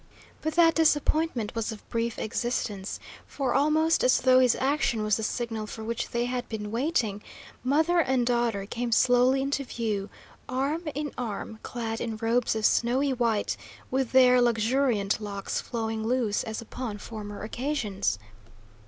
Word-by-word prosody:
But 315 0 -2
that 335 -1 +6
disappointment 305 -6 +1
was 230 0 -2
of 215 - -10
brief 230 0 -1
existence, 220 -4 -2 0.3
for, 270 -3 -1
almost 310 +3 +3
as 255 - +4
though 255 0 +6
his 250 -2 +4
action 265 -5 +1
was 215 -1 +2
the - - -4
signal 225 -1 -3
for 220 - -7
which 230 +1 -3
they 240 0 0
had 245 0 -3
been 210 -2 -5
waiting, 230 -5 0 0.4
mother 315 +7 +3
and 260 -6 +2
daughter 235 -5 0
came 235 +3 -3
slowly 250 +3 +4
into 275 0 -1
view, 215 -6 -3 0.4
arm 285 +6 -1
in 295 -1 -3
arm, 220 -1 -5
clad 225 -2 -4
in 225 -2 -3
robes 230 +1 +1
of 220 -1 0
snowy 260 +4 +2
white, 230 -4 0 0.4
with 260 -2 0
their 250 -1 +6
luxuriant 230 -2 +1
locks 200 -2 -3
flowing 225 -2 -3
loose 230 -3 0
as 220 0 -4
upon 230 -2 -5
former 205 -1 -7
occasions. 220 - -1
240 Hz, 155 wpm, -27 LUFS, 220-265 Hz, 0.4 s, that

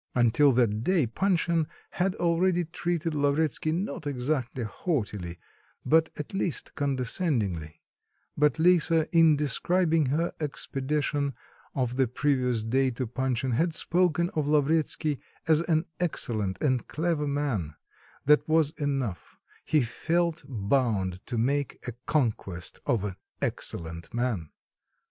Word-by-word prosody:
Until 125 +4 +5
that 115 -3 +2
day, 180 -4 +3
Panshin 170 - +1 0.2
had 190 +1 0
always 175 +1 +2
treated 170 -2 -1
Lavretsky, 150 +1 +1
not 160 -3 -3
exactly 130 -2 -2
haughtily, 105 - -3 0.5
but 160 +1 +4
at 150 - -6
least 185 -5 -2
condescendingly; 125 - -1 0.5
but 150 +1 +3
Lisa, 165 -1 +4
in 165 -2 +7
describing 160 +2 +1
her 160 +6 0
expedition 145 -1 -2 0.4
of 125 -2 -1
the 130 -1 +3
previous 125 -3 0
day 130 +4 +2
to 125 +1 -3
Panshin, 130 +1 -1
had 160 +7 +1
spoken 175 0 +2
of 150 -2 -1
Lavretsky 150 0 +2 0.3
as 160 -1 +5
an 165 -1 +1
excellent 110 - -1
and 130 -4 +1
clever 160 -2 -1
man, 130 - -1 0.5
that 150 +2 +4
was 155 -2 +3
enough; 135 - -3 0.3
he 155 -4 +3
felt 170 +7 -1
bound 105 -6 0
to 120 - -3
make 140 +4 0
a - - -2 0.2
conquest 105 - -1
of 115 -5 +1
an 100 -3 -4 0.2
"excellent 85 0 -4
man." 115 -10 -1
145 Hz, 120 wpm, -28 LUFS, 120-160 Hz, 0.5 s, in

